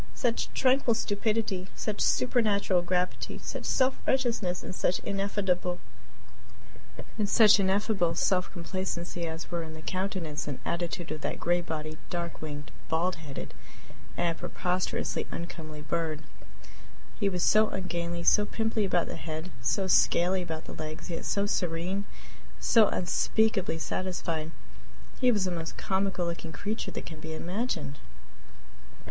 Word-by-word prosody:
Such 240 -3 0
tranquil 255 -2 +4
stupidity, 210 -3 0
such 210 -1 -2
supernatural 210 -7 +3
gravity, 180 +1 -1
such - - -5
self 260 0 +2
righteousness, 235 -9 +1
and - - -5
such 180 0 +1
ineffable 195 -3 0 2.4
self 180 +1 +2
complacency 175 -1 -3
as 160 +2 -6
were 170 -1 -1
in 160 -1 -7
the 155 - -10
countenance 185 -6 -2
and 140 -3 -3
attitude 175 +1 -2
of 155 - -4
that - - -2
gray 175 +1 +2
bodied, 155 -2 -5
dark 170 -1 -3
winged, 150 -1 -6 0.2
bald 170 +2 +1
headed, 150 -4 -7 0.6
and 170 -1 +1
preposterously 180 0 -1
uncomely 155 -3 -6
bird! 160 -2 -1 1.0
He 200 - +3
was 180 -2 -1
so 215 0 +5
ungainly, 170 -2 -2
so 210 - +6
pimply 220 -1 0
about 175 -3 +2
the - - -5
head, 160 +2 -5
so 190 +11 +1
scaly 185 0 +4
about 160 -3 -4
the - - -7
legs, 155 +2 -6
yet 165 - -3
so 200 0 +1
serene, 180 +1 -1 0.5
so 225 -3 +6
unspeakably 195 0 +2
satisfied! 165 -2 -2 0.7
He 250 -2 +5
was 205 -5 +2
the 185 - 0
most 165 -2 -4
comical 190 -2 0
looking 170 -1 -4
creature 210 +9 -3
that - - -5
can 160 -2 -8
be 160 0 -5
imagined. 170 - -2
180 Hz, 130 wpm, -29 LUFS, 165-200 Hz, 2.4 s, so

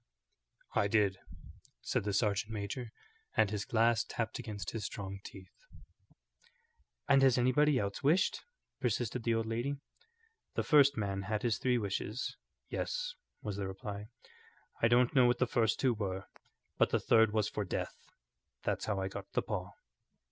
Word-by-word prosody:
"I 100 - +3
did," 100 -3 +2 0.6
said - - -1
the 105 - 0
sergeant 105 0 +1
major, 110 +4 -4 0.5
and 105 - +4
his 105 -1 -2
glass 115 0 +3
tapped 110 -1 -3
against 100 -5 -5
his 110 -2 -4
strong 100 -1 -5
teeth. 95 -2 -11 1.5
"And 140 -1 +6
has 130 -2 +5
anybody 130 +4 +4
else 100 -3 -2
wished?" 165 +8 +3 0.4
persisted 120 -1 -1
the 115 0 +1
old 115 0 0
lady. 120 +5 -1 0.8
"The - - +1
first 140 -3 +5
man 100 -2 -1
had 105 +2 -2
his 115 -3 +1
three 125 -1 +2
wishes. 105 +2 -2 0.3
Yes," - - -2 0.3
was 105 -2 -3
the 100 -1 -2
reply; 100 +2 -6 0.7
"I 115 - +6
don't 120 +2 +4
know 130 -3 +6
what 120 0 +3
the 125 - +3
first 115 -2 +1
two 130 -3 +3
were, 95 -3 -3 0.5
but - - +5
the - - +2
third 110 -1 +4
was 105 -1 +1
for 105 - -2
death. 95 - -3 0.7
That's - - -1
how 100 -2 -1
I 95 - -1
got - - -8
the - - +1
paw." - - -3
110 Hz, 160 wpm, -33 LUFS, 100-125 Hz, 1.5 s, And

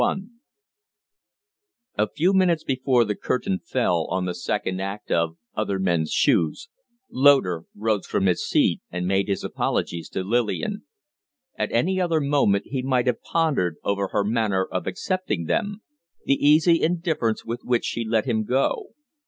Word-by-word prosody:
XXXI 195 +1 0 1.7
A - - +2
few 180 +5 +1
minutes 180 -4 +3
before 130 -2 +2
the 105 - -1
curtain 190 - -2
fell 90 - 0
on 95 0 -1
the 90 - -2
second 95 +1 -2
act 100 +2 -5
of 85 0 +1 0.2
'Other 105 -2 -1
Men's 85 -4 0
Shoes' 85 - +1 0.4
Loder 130 - +4
rose 105 -2 -1
from 95 - 0
his 90 -2 +1
seat - - +2
and 90 0 -3
made 95 +1 +1
his 100 - -2
apologies 85 -1 -2
to 95 - -3
Lillian. 120 - -1 0.7
At - - -2
any 185 +11 +1
other 165 -3 +1
moment 140 -9 +2
he 130 -1 -3
might 130 -1 +1
have 125 -2 0
pondered 140 - 0
over 100 -1 0
her 100 +1 0
manner 105 -3 +1
of 95 - -4
accepting 185 - -2
them 205 - -2 0.4
the - - +3
easy 155 +4 +4
indifference 160 - 0
with 120 +1 -4
which 120 -1 0
she 115 - -2
let 110 +1 0
him 110 -4 0
go. 130 +5 -1
115 Hz, 155 wpm, -24 LUFS, 95-155 Hz, 1.7 s, Loder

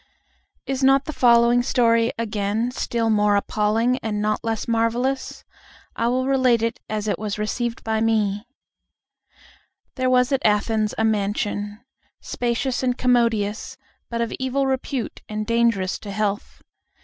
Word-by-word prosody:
Is 270 0 -2
not 270 +1 +4
the 310 - -5
following 240 -1 +4
story 230 -1 +2
again 220 +1 -1
still 230 -2 -1
more 210 -1 +3
appalling 220 +5 +1
and 210 -2 -3
not 215 0 -1
less 225 -2 -2
marvelous? 235 +4 -1 0.5
I 230 - 0
will 255 +2 0
relate 260 -4 +3
it 230 0 -1
as 215 0 -3
it 205 - -1
was 210 -1 -3
received 230 +2 -3
by 220 -1 -1
me: 215 -1 0 1.5
There 255 0 +1
was 250 +1 +3
at 270 - +1
Athens 215 0 +1
a 220 - +1
mansion, 205 0 -1 0.4
spacious 245 +1 -2
and 250 -1 0
commodious, 235 -1 +1 0.3
but 235 0 -2
of 230 - -2
evil 260 +1 0
repute 265 -2 -3
and 215 0 -3
dangerous 230 -5 +1
to 205 - -9
health. 205 0 -3
230 Hz, 140 wpm, -22 LUFS, 210-250 Hz, 1.5 s, not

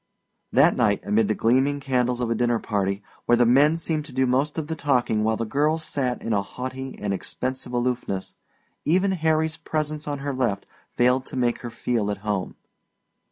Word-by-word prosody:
That - - +5
night, 100 -1 +1
amid 105 +1 +2
the 110 - +1
gleaming 130 +5 +2
candles 125 -2 0
of 120 -1 -1
a - - +4
dinner 120 +1 +1
party, 100 -2 -1 0.2
where 120 - +6
the 120 - +5
men 140 +6 +5
seemed 160 -2 -2
to 150 - -10
do 130 +1 +1
most 135 +5 +1
of 160 - -1
the 160 +1 -4
talking 125 -7 +1
while 110 0 +1
the 115 - -2
girls 150 +7 +1
sat 125 -6 -2
in 115 - -1
a 100 - +2
haughty 130 +5 -6
and 105 -1 -2
expensive 130 +5 -4
aloofness, 120 -6 -2 0.5
even 185 +5 +2
Harry's 160 -2 +1
presence 155 -2 -3
on 145 -1 -2
her 140 0 -3
left 120 -6 -1 0.3
failed 125 +2 +2
to - - -8
make 120 -1 +1
her 120 - -6
feel 115 -2 -1
at 105 - -2
home. 100 -3 -2
125 Hz, 195 wpm, -24 LUFS, 115-145 Hz, 0.5 s, where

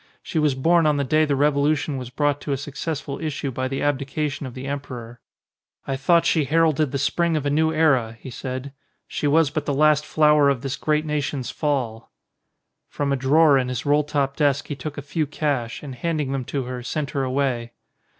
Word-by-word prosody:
She 160 - -2
was 150 -3 +2
born 165 +4 +3
on 150 -1 +2
the 140 - +1
day 155 +4 +3
the 145 -2 0
revolu 145 +2 +2
tion 145 0 -3
was 125 -2 -5
brought 145 +2 0
to 145 - -4
a 135 - +1
successful 145 0 -5
issue 145 -3 -3
by 130 +1 -2
the 135 +1 -3
abdi 145 -1 0
cation 145 0 -3
of 125 - -10
the 130 +1 -6
emperor. 125 -4 -6 0.7
"I 135 - -2
thought 170 +5 +3
she 160 -3 +2
heralded 155 -1 +2
the 140 - -1
Spring 165 +4 +1
of 145 - -3
a 145 - +1
new 160 +2 +2
era," 135 -8 +2
he 130 - -9
said. 130 +2 -5 0.3
"She 145 - -2
was 150 0 +3
but 155 -1 -3
the 140 - 0
last 150 +1 +4
flower 150 -2 +4
of 135 -4 0
this 135 -1 -3
great 155 0 0
nation*s 145 -3 -2
Fall." 125 -7 -2 0.8
From 140 -1 -1
a - - +3
drawer 140 +2 +4
in 125 -1 -2
his 125 -2 -4
roll 145 +1 +3
top 140 -2 -1
desk 145 -2 +1
he 145 - -3
took 145 +2 -7
a - - -5
few 155 -3 -2
cash, 140 -6 -2
and 140 -3 -6
handing 150 +1 -2
them 135 -2 -2
to 140 +1 -2
her, 125 0 -5
sent 140 +4 -3
her 140 - -1
away. 130 -3 -1
145 Hz, 220 wpm, -23 LUFS, 130-150 Hz, 0.8 s, last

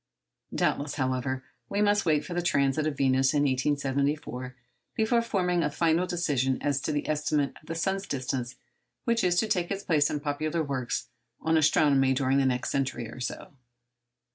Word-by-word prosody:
Doubtless, 145 0 0
however, 130 -1 -1 0.3
we 200 - -1
must 205 -2 +2
wait 150 -2 +2
for 175 - -6
the 175 - 0
transit 150 -2 +1
of 145 -3 -3
Venus 135 +1 +3
in 145 - +3
1874 140 -1 -1 0.4
before 230 +2 +2
forming 180 -6 0
a 150 - +1
final 165 +4 +1
decision 145 -7 0
as 140 -2 0
to 155 - -2
the 145 -1 -2
estimate 150 -2 0
of 155 - -22
the 165 - -4
sun's 190 +4 -1
distance 130 -2 -3 0.5
which 235 -2 +1
is 180 -1 +3
to 220 - +1
take 180 -5 0
its 200 0 -3
place 150 -5 +3
in 150 - -2
popular 155 +3 -1
works 130 -4 -3 0.3
on 160 0 +1
astronomy 145 -4 +4
during 135 +1 +2
the 135 - +3
next 125 -1 -1
century 135 -4 -1
or 120 - -10
so. 125 - -5
145 Hz, 175 wpm, -28 LUFS, 135-170 Hz, 0.5 s, astronomy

